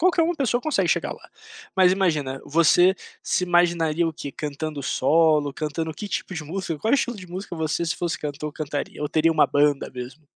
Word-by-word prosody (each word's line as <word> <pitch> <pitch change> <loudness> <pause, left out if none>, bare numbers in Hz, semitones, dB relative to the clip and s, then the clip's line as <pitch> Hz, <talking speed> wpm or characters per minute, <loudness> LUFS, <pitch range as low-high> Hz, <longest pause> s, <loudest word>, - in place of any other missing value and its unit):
qualquer 350 0 +4
uma 340 +2 +1
pessoa 245 -4 0
consegue 310 - +1
chegar - - +1
lá, - - -15 0.5
mas 185 -1 +6
imagina, 150 -9 0
você 170 +4 +5 0.3
se 180 - 0
imaginaria 170 -2 +2
o 160 - -4
quê, 140 - -7
cantando 150 0 -5
solo, 150 +1 +3
cantando 155 +2 -3
que 205 +7 -7
tipo 190 - -3
de 160 - -4
música, 165 0 -4
qual 225 - +2
estilo 245 -3 0
de 185 -2 -10
música 180 +1 -6
você 160 +1 -1
se 165 - -1
fosse 170 -2 -2
cantor 150 +1 -4
cantaria, 150 -1 -4
ou 150 - -1
teria 160 +1 +3
uma 155 - +4
banda 145 -1 +2
mesmo? 130 +4 -9
160 Hz, 195 wpm, -24 LUFS, 150-180 Hz, 0.5 s, mas